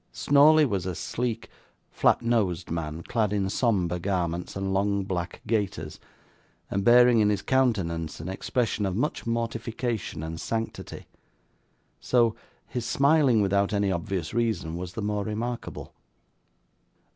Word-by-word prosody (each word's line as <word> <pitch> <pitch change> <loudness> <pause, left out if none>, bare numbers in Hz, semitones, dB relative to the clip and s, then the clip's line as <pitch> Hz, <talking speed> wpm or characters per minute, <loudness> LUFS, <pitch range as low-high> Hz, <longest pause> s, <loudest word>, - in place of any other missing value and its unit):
Snawley 150 +2 +5
was 100 -8 -2
a 90 - -3
sleek, 120 +3 -3 0.4
flat - - +2
nosed 100 -8 0
man, 80 0 -4
clad 110 -4 0
in 100 -2 0
sombre 95 -7 +1
garments, 90 -2 -2
and 95 0 -2
long 100 0 +1
black 90 -3 -4
gaiters, 95 -8 -2 0.7
and 100 - 0
bearing 120 +1 +6
in 105 -1 +4
his 105 -1 -1
countenance 95 -12 0
an - - -6
expression 105 +2 -1
of 95 - -2
much 125 +2 -2
mortification 115 -5 -3
and 80 +1 -5
sanctity; 115 0 -4 0.9
so, 120 -3 +2 0.3
his 125 - -4
smiling 140 -4 +3
without 100 +1 +1
any 100 -1 +1
obvious 90 -1 -3
reason 110 -8 -1
was 90 0 -6
the 110 - -4
more 105 0 -1
remarkable. 115 +3 -5
105 Hz, 135 wpm, -26 LUFS, 90-115 Hz, 0.9 s, bearing